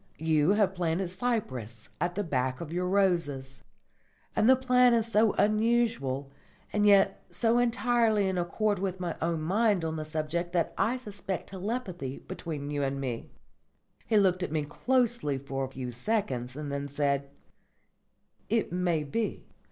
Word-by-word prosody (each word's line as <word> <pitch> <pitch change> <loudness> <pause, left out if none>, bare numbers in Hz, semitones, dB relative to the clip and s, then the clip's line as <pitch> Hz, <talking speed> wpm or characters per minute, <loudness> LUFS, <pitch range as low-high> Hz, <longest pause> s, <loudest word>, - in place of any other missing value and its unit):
You 160 +2 +3
have 205 -2 +2
planted 175 0 -1
cypress 130 - -3
at 175 +2 -1
the 205 - 0
back 130 -6 -1
of 165 -1 -6
your 180 +1 0
roses; 170 -9 0 0.7
and 220 - +4
the 260 - +8
plan 250 -1 +4
is 225 -2 +2
so 220 -1 +3
unusual 215 - +1 0.4
and 210 0 +3
yet 200 -1 +4
so 225 +7 +2
entirely 235 -3 +2
in 190 - -1
accord 205 +3 0
with 190 -1 -2
my 175 -2 -3
own 165 -1 0
mind 200 0 +2
on 160 0 -2
the 155 - -3
subject 155 +3 -3
that 170 -2 +1
I 225 +6 +1
suspect 200 -6 -5
telepathy 190 - -4
between 150 -4 -6
you 145 -1 -1
and 135 0 -1
me." 125 -4 -4 0.8
He 220 - +3
looked 185 -2 +3
at 180 - -2
me 155 -1 0
closely 235 - 0
for 135 0 -3
a - - -8
few 130 -2 -5
seconds, 125 - -2
and 145 -1 -5
then 140 0 -3
said: 140 -1 0 1.2
"It 225 -3 +1
may 175 -3 0
be. 215 +10 -3
180 Hz, 160 wpm, -29 LUFS, 145-215 Hz, 1.2 s, the